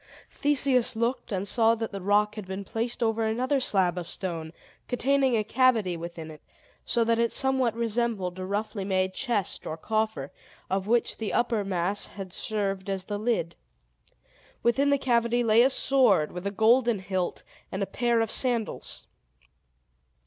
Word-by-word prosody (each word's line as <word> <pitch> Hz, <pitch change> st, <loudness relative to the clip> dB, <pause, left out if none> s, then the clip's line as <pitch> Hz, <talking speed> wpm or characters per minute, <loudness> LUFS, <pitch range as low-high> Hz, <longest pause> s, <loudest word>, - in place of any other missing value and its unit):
Theseus 275 Hz, -5 st, +2 dB
looked, 235 Hz, +2 st, -1 dB
and 195 Hz, 0 st, -2 dB
saw 225 Hz, +2 st, +3 dB
that 225 Hz, 0 st, -4 dB
the 195 Hz, -2 st, -6 dB
rock 205 Hz, +2 st, +2 dB
had 215 Hz, -3 st, -8 dB
been 190 Hz, +1 st, -5 dB
placed 235 Hz, +4 st, -3 dB
over 225 Hz, 0 st, +1 dB
another 250 Hz, +6 st, +1 dB
slab 185 Hz, -7 st, +1 dB
of 170 Hz, -, -7 dB
stone, 165 Hz, -4 st, -5 dB, 0.4 s
containing 265 Hz, 0 st, +2 dB
a 215 Hz, -, +1 dB
cavity 225 Hz, -5 st, +2 dB
within 165 Hz, -1 st, -7 dB
it; 155 Hz, -, -13 dB, 0.4 s
so 235 Hz, -1 st, +1 dB
that 230 Hz, 0 st, +1 dB
it 235 Hz, -1 st, +2 dB
somewhat 265 Hz, -4 st, +1 dB
resembled 225 Hz, -5 st, -1 dB
a 185 Hz, -, -4 dB
roughly 205 Hz, +1 st, -2 dB
made 190 Hz, -1 st, 0 dB
chest 230 Hz, -7 st, -2 dB
or 155 Hz, -, -4 dB
coffer, 215 Hz, -7 st, -2 dB, 0.4 s
of 190 Hz, +1 st, -1 dB
which 235 Hz, +1 st, +1 dB
the 220 Hz, -2 st, -2 dB
upper 235 Hz, -3 st, +1 dB
mass 195 Hz, +1 st, -1 dB
had 190 Hz, -2 st, -8 dB
served 195 Hz, -3 st, -2 dB
as 190 Hz, -1 st, -2 dB
the 205 Hz, +1 st, -4 dB
lid. 215 Hz, -7 st, -1 dB, 1.1 s
Within 270 Hz, +4 st, +3 dB
the 280 Hz, -, +4 dB
cavity 240 Hz, -2 st, +1 dB
lay 225 Hz, 0 st, +5 dB
a 260 Hz, -, +5 dB
sword, 250 Hz, -, +3 dB
with 180 Hz, +2 st, -5 dB
a -, -, +1 dB
golden 230 Hz, +3 st, +3 dB
hilt, 185 Hz, -2 st, -3 dB, 0.3 s
and 190 Hz, +1 st, -2 dB
a -, -, 0 dB
pair 235 Hz, +2 st, +1 dB
of 225 Hz, -, -1 dB
sandals. 240 Hz, -4 st, -2 dB
220 Hz, 165 wpm, -27 LUFS, 190-240 Hz, 1.1 s, lay